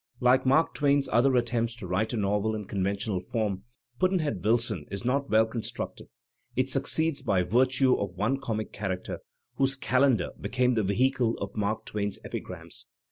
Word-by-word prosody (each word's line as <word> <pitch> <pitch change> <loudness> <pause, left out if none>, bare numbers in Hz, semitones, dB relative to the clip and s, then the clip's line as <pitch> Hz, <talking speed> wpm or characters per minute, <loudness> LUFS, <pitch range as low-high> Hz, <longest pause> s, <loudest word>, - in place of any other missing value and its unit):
Like 130 +1 +3
Mark 155 +5 +3
Twain's 140 -1 +2
other 125 +4 +4
attempts 120 -1 0
to 115 - -8
write 95 +5 0
a 120 - -2
novel 105 +1 0
in 105 -1 -5
conven 100 0 -1
tional 100 -2 -3
form, 105 -4 -1 0.3
"Pudd'nhead 155 - 0
Wilson*' 110 -7 +1
is 100 +3 -6
not 140 +2 0
well 110 +1 +5
constructed; 110 0 -5 0.5
it 130 +1 0
succeeds 155 +2 +1
by 100 -8 +1
virtue 130 +6 +3
of 95 -3 -2
one 115 +8 0
comic 110 -6 -4
character, 95 -3 -4 0.4
whose 135 0 +2
"cal 130 -1 +1
endar" 130 -9 +3
became 125 0 +1
the 110 - +1
vehicle 120 +4 +1
of 100 0 -6
Mark 105 +1 -1
Twain's 100 -1 -3
epigrams. - - -8
115 Hz, 170 wpm, -28 LUFS, 100-130 Hz, 0.5 s, well